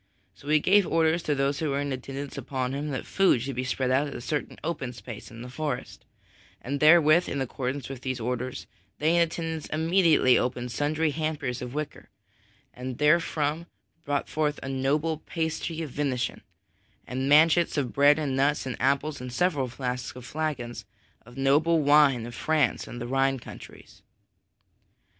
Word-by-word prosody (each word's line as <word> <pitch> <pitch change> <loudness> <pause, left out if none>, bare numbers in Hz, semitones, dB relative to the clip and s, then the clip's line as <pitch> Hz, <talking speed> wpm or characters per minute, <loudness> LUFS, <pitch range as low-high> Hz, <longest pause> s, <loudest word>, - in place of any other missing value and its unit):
So 145 - -16
he 155 +1 +4
gave 195 +4 +4
orders 165 +1 +2
to 150 -2 0
those 140 +1 0
who 155 - -1
were 140 0 0
in 145 -1 -2
attendance 135 +2 -6
upon 130 -1 -3
him 145 +2 -3
that 135 -3 -4
food 195 -10 +3
should 135 -1 -4
be 125 - -2
spread 130 0 -1
at 140 +3 +2
a - - -5
certain 145 +4 -3
open 145 -6 -3
space 115 -2 -9
in 115 +1 -10
the - - -8
forest; 140 0 -5 0.5
and 140 +3 -4
therewith, 155 +2 +6
in 140 - -2
accordance 130 +1 -3
with 135 -2 -8
those 130 -1 -3
orders, 125 +2 -3 0.3
they 160 +3 +2
in 170 - +4
attendance 165 -1 -2
immediately 160 -5 +4
opened 125 -1 -2
sundry 150 +5 0
hampers 150 -5 -3
of 125 +2 -6
wicker, 150 0 -5 0.6
and 125 0 -6
therefrom 155 +1 +1 0.4
brought 145 -1 -1
forth 150 -1 -1
a 135 - -4
noble 145 +4 0
pasty 160 0 -3
of 150 - -7
venison, 130 -3 -2 0.6
and 130 +2 -2
manchets 160 +3 +5
of 135 -4 -1
bread 145 +1 +5
and 145 -4 -1
nuts 140 +2 +1
and 130 - -4
apples 140 +2 0
and 125 0 -6
several 145 -2 +1
flasks 125 0 -4
and 125 -1 -10
flagons 130 -7 -4 0.4
of 120 +2 -14
noble 150 +5 +3
wine 145 -5 +4
of 120 - -8
France 150 0 0
and 120 - -7
the 120 - -4
Rhine 135 +1 +1
countries. 120 - -12
140 Hz, 170 wpm, -27 LUFS, 130-155 Hz, 0.6 s, therewith